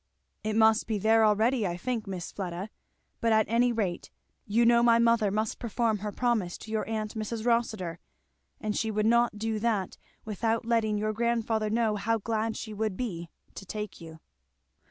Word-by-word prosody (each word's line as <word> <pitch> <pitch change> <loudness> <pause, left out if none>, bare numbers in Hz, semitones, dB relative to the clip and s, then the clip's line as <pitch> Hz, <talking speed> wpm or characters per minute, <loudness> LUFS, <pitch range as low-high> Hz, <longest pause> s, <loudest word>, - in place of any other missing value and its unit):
"It 215 0 -1
must 220 0 +4
be 220 -2 0
there 220 +2 +4
already, 220 +1 +3
I 175 0 -3
think, 230 +1 -3
Miss 185 -3 -5
Fleda; 190 +2 -5 0.5
but 230 - +1
at 220 -1 +4
any 240 +2 +3
rate 200 -7 -2 0.4
you 230 +3 +3
know 235 0 +5
my 235 -1 +5
mother 230 -2 +3
must 215 +2 -2
perform 230 -2 0
her 210 +1 -4
promise 220 -7 0
to 220 - -10
your 220 0 -2
aunt 215 -1 -3
Mrs. 220 0 -4
Rossitur; 215 -8 0 0.6
and 215 -1 -2
she 220 - 0
would 215 0 0
not 235 -1 +3
do 220 0 -2
that 210 -4 -1 0.3
without 225 +2 -1
letting 225 -2 +1
your 215 +1 -1
grandfather 225 -1 0
know 220 -1 +1
how 225 +3 +1
glad 220 +1 -2
she 215 - -6
would 210 -2 -2
be 170 -9 -4 0.2
to - - -8
take 210 0 -6
you." 160 -1 -10
220 Hz, 180 wpm, -28 LUFS, 210-230 Hz, 0.6 s, know